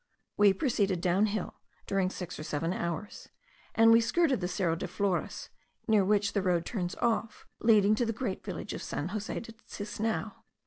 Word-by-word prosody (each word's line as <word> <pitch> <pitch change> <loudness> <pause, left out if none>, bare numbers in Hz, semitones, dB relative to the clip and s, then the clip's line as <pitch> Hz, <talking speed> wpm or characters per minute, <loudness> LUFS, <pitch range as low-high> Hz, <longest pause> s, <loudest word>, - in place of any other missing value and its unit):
We 205 -1 +6
proceeded 200 - 0
down 185 +4 +2
hill 210 -2 -3 0.3
during 195 -2 +1
six 180 -2 -7
or - - -5
seven 155 +3 -2
hours; 170 +4 -4 0.5
and 225 0 +7
we 230 +1 +7
skirted 275 - +2
the 180 - 0
Cerro 180 -3 0
de 165 - -4
Flores, 190 0 -2 0.4
near 215 -3 +4
which 205 +1 +2
the 200 - +1
road 180 -3 +1
turns 180 -5 -3
off, 230 -1 -1
leading 215 -2 +5
to 235 +3 +1
the - - +1
great 230 -4 -4
village 185 -5 -5
of - - -5
San 155 - -3
Jose 210 +1 -3
de 225 - -9
Tisnao. 220 0 -4
200 Hz, 180 wpm, -30 LUFS, 180-220 Hz, 0.5 s, and